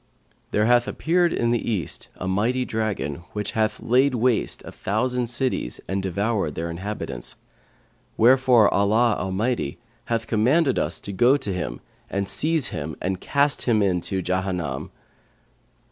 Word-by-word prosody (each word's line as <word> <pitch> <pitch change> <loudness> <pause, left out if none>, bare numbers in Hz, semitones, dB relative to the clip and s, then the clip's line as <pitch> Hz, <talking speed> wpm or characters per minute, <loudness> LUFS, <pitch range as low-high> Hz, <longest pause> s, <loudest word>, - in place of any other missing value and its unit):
There 105 - +2
hath 120 +1 +4
appeared 175 +1 +1
in 120 0 +1
the 120 - +1
East 95 -10 -2
a 95 - -5
mighty 115 +7 +1
dragon, 110 - -2 0.2
which 105 -1 -3
hath 110 -2 0
laid 130 +3 +3
waste 120 -1 +1
a - - -8
thousand 125 +4 -1
cities 125 - -2
and 95 +2 -1
devoured 95 -3 -1
their 85 +1 -3
inhabitants; 85 - -5 0.8
wherefore 125 -2 +5
Allah 110 +3 +3
Almighty 95 - -1 0.3
hath 115 -1 -1
commanded 130 +7 +2
us - - -1
to 100 - -5
go 120 +7 +4
to 115 -8 -3
him 65 -10 -4 0.3
and 100 0 -2
seize 155 +3 +1
him 75 -1 -5
and 95 0 -2
cast 140 0 +1
him 110 -3 +3
into 95 0 0
Jahannam.' 90 -7 -2
110 Hz, 145 wpm, -24 LUFS, 95-125 Hz, 0.8 s, wherefore